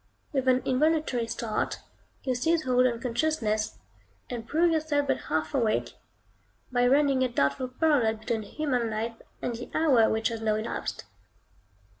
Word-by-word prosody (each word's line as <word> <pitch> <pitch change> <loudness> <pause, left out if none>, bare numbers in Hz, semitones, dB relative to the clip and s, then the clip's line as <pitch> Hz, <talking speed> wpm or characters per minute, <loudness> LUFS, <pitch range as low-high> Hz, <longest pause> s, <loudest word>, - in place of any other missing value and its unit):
With 265 -2 0
an 255 0 +4
involuntary 270 -3 +1
start, 225 -1 -2 0.5
you 260 - 0
seize 320 +6 +1
hold 255 0 +3
on 235 -2 -2
consciousness, 230 -4 -1 0.5
and 230 -2 -5
prove 335 +2 +3
yourself 305 -2 +1
but - - -1
half 160 0 -1
awake, 230 -6 +1 0.8
by 245 0 +3
running 275 0 +3
a - - +3
doubtful 140 - 0
parallel 255 -4 +2
between 220 +1 -3
human 250 +1 -1
life 225 +1 -4 0.2
and 245 - -1
the 240 - -8
hour 265 -9 +4
which 220 +1 +1
has 230 -1 -5
now 215 -1 +1
elapsed. 215 +2 -4
245 Hz, 150 wpm, -28 LUFS, 225-285 Hz, 0.8 s, an